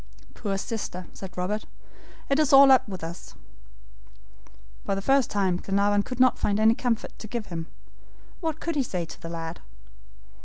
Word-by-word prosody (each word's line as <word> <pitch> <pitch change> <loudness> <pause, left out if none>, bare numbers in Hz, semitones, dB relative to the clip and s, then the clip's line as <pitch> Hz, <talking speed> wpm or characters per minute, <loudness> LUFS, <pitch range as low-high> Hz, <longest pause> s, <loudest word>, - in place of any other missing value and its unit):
"Poor 195 -2 -3
sister!" 195 -4 -4
said 185 -2 -9
Robert. 200 +4 -2 0.6
"It 275 +2 +2
is 305 -3 +3
all 275 0 +9
up 260 -4 +5
with 185 -4 -7
us." 165 +2 -8 1.5
For 195 - -1
the 195 - -3
first 270 +1 +3
time 190 -3 +1
Glenarvan 200 +2 +2
could 250 +4 -7
not 255 -1 +4
find 205 0 +1
any 220 +1 +6
comfort 235 -1 -2
to 215 - -7
give 230 0 -4
him. 165 -3 -6 0.7
What 320 -3 -3
could 335 -1 -3
he 285 - +2
say 180 -9 -3
to - - -12
the 165 - -6
lad? 165 0 -5
205 Hz, 170 wpm, -26 LUFS, 185-255 Hz, 1.5 s, all